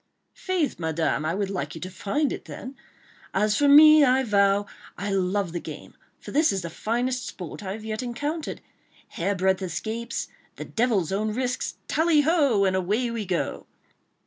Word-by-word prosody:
"Faith, 360 - -2
Madame, 160 -2 0
I 160 +3 0
would 200 -1 -2
like 155 -6 -4
you 160 - -8
to 185 - -6
find 275 +10 -1
it - - -8
then... 260 +2 -8 0.6
as 210 0 +2
for 290 - +3
me, 305 +1 +9
I 260 0 +4
vow, 200 -2 +3 0.3
I 200 +2 -3
love 190 -1 0
the 175 - -3
game, - - -9 0.3
for - - -10
this 305 -2 +3
is 190 -2 -2
the 170 - -5
finest 245 +5 -2
sport 180 -4 -8
I 190 -1 -4
have 215 +1 -8
yet 215 +1 -3
encountered.—Hair 245 - -5
breadth 190 +1 +1
escapes... 225 +6 -4 0.3
the - - -7
devil's 220 -8 0
own 210 +2 -1
risks!—Tally 295 +5 0
ho!—and 275 - +3
away 210 +7 0
we 225 -4 -4
go!" 180 -2 -2
215 Hz, 165 wpm, -25 LUFS, 190-260 Hz, 0.6 s, me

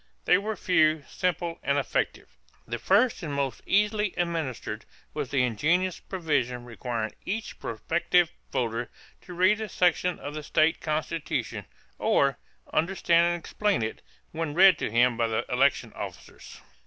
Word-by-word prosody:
They 180 - +5
were 215 +2 -3
few, 155 -5 +2
simple, 175 -2 -2
and 140 +1 +1
effective. 140 - -1 0.4
The 120 0 -4
first 215 +5 +3
and 155 -5 -4
most 135 -4 -2
easily 210 0 +2
administered 165 -7 -2 0.3
was - - -3
the 135 -3 +2
ingenious 165 - +1
provision 135 -9 -2
requiring 115 -2 -4
each 220 +3 -4
prospective 170 +8 +1 0.2
voter 120 0 -1 0.3
to 180 - -10
read 190 +5 +3
a 215 - -4
section 180 0 +2
of 145 - -7
the 155 - -5
state 155 +2 +2
constitution 150 - -2 0.3
or 140 -2 +2 0.3
"understand 170 0 +3
and 175 0 -1
explain 205 - 0
it" 110 - -4 0.3
when 160 -2 -3
read 185 -2 +7
to - - -1
him 120 +1 +3
by 115 -1 +2
the 110 -1 -1
election 135 +3 +2
officers. - - -9
160 Hz, 145 wpm, -27 LUFS, 125-180 Hz, 0.4 s, read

